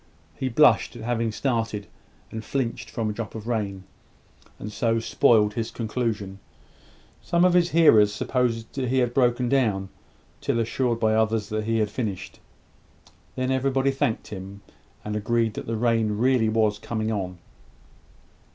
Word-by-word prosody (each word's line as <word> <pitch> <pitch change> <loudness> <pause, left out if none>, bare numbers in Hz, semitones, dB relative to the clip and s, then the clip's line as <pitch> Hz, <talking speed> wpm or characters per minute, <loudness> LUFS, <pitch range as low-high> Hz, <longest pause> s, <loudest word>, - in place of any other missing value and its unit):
He 130 - -3
blushed 150 0 +4
at 115 - -8
having 115 -1 -1
started 115 -4 -2 0.5
and 110 0 -6
flinched 125 -1 -3
from 115 -2 -2
a 105 - -1
drop 110 0 -6
of 110 0 -7
rain, 100 -5 -2 0.7
and 105 - -7
so 115 +1 0
spoiled 105 -2 +3
his 115 0 -3
conclusion. 110 -4 -3 0.8
Some 175 0 +2
of 180 - +4
his 175 -1 +4
hearers 115 -12 +6
supposed 115 +2 -2
he 130 -1 0
had 120 -2 +1
broken 125 -1 +2
down, 110 -8 +1 0.5
till 115 - 0
assured 115 +1 0
by 110 -1 +2
others 110 -1 +1
that 110 -1 -2
he 115 0 +1
had 105 -2 0
finished. 95 -6 -4 1.0
Then 130 0 -1
everybody 135 +1 +1
thanked 135 -4 -1
him, 100 0 -8 0.4
and 105 0 -3
agreed 115 +1 0
that - - -7
the 115 0 -2
rain 115 -1 +2
was 125 +2 +3
really 110 -1 +2
coming 110 -1 -2
on. 95 -4 -3
115 Hz, 150 wpm, -25 LUFS, 105-125 Hz, 1.0 s, hearers